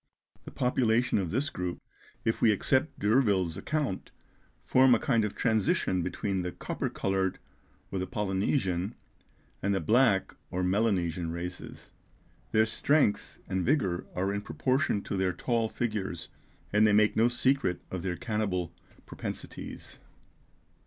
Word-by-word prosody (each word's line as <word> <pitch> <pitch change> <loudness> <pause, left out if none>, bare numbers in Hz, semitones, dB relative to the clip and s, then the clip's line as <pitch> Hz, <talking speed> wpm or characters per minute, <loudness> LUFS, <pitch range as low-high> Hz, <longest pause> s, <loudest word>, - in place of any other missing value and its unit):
The - - -8
population 120 -2 +2
of 90 -4 -2
this 130 - -1
group, 90 -1 -4 0.5
if 110 - 0
we 110 - +6
accept 130 +8 +1
D'Urville's 105 -7 +2
account, 145 -11 -2 0.6
form 130 -1 +6
a - - 0
kind 115 -5 +2
of 105 - -3
transition 110 -5 +1
between 95 +2 -2
the 90 0 -3
copper - - -4
coloured, 95 -1 -1 0.5
or 95 - -2
the 95 - -2
Polynesian, 95 -2 -1 0.7
and 100 0 +1
the - - +1
black 110 - +3 0.2
or 90 +1 -2
Melanesian 90 -4 +1
races. 90 +1 -7 0.6
Their 110 0 +4
strength 140 0 +1
and 95 -1 -1
vigour 100 - +1
are 95 +2 0
in 100 - -2
proportion 105 - 0
to 100 - -3
their 95 -1 +1
tall 115 +4 0
figures, 105 -9 -3 0.4
and 105 +1 +5
they 105 - +3
make 105 +1 +4
no 115 +2 +4
secret 120 -5 +1
of 95 - -3
their 90 -1 -2
cannibal 95 -6 -2 0.3
propensities. - - -7
100 Hz, 140 wpm, -29 LUFS, 90-115 Hz, 0.7 s, we